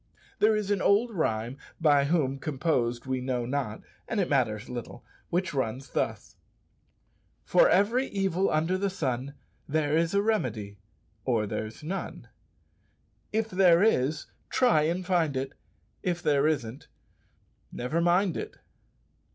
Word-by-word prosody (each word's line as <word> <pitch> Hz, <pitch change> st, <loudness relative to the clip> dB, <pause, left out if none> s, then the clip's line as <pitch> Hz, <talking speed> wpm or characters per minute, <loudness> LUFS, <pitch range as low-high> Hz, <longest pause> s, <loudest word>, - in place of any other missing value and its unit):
There 215 Hz, +1 st, +4 dB
is 210 Hz, -1 st, -1 dB
an 200 Hz, -2 st, +1 dB
old 215 Hz, +5 st, +3 dB
rhyme, 125 Hz, -, -2 dB, 0.2 s
by 145 Hz, -4 st, +4 dB
whom 140 Hz, -4 st, +1 dB
composed 130 Hz, -5 st, -1 dB
we 130 Hz, -1 st, -2 dB
know 125 Hz, -2 st, -1 dB
not, 125 Hz, -4 st, -3 dB, 0.2 s
and 225 Hz, -, -1 dB
it 180 Hz, -, 0 dB
matters 110 Hz, -6 st, +1 dB
little, 120 Hz, -2 st, -7 dB, 0.2 s
which 185 Hz, +1 st, -1 dB
runs 130 Hz, 0 st, -2 dB
thus, -, -, -3 dB, 1.1 s
"For -, -, +5 dB
every 240 Hz, -, +3 dB
evil 195 Hz, -1 st, 0 dB
under 165 Hz, +5 st, +1 dB
the 200 Hz, 0 st, 0 dB
sun 140 Hz, -6 st, -3 dB, 0.3 s
There 150 Hz, 0 st, +1 dB
is 165 Hz, +3 st, +1 dB
a 200 Hz, -, +4 dB
remedy 115 Hz, -, -1 dB, 0.4 s
or 115 Hz, -4 st, +1 dB
there's 110 Hz, +6 st, -5 dB
none. 185 Hz, +6 st, -5 dB, 1.0 s
If 220 Hz, 0 st, -1 dB
there 180 Hz, -1 st, +5 dB
is 150 Hz, -8 st, +2 dB, 0.2 s
try 160 Hz, -12 st, +3 dB
and 180 Hz, +2 st, -2 dB
find 165 Hz, -7 st, +1 dB
it; 135 Hz, +1 st, -3 dB, 0.5 s
If 175 Hz, -1 st, -2 dB
there 145 Hz, 0 st, +3 dB
isn't 130 Hz, -5 st, -2 dB, 0.8 s
never 140 Hz, +8 st, -2 dB
mind 175 Hz, +1 st, +2 dB
it!" -, -, -6 dB
155 Hz, 135 wpm, -28 LUFS, 130-190 Hz, 1.1 s, For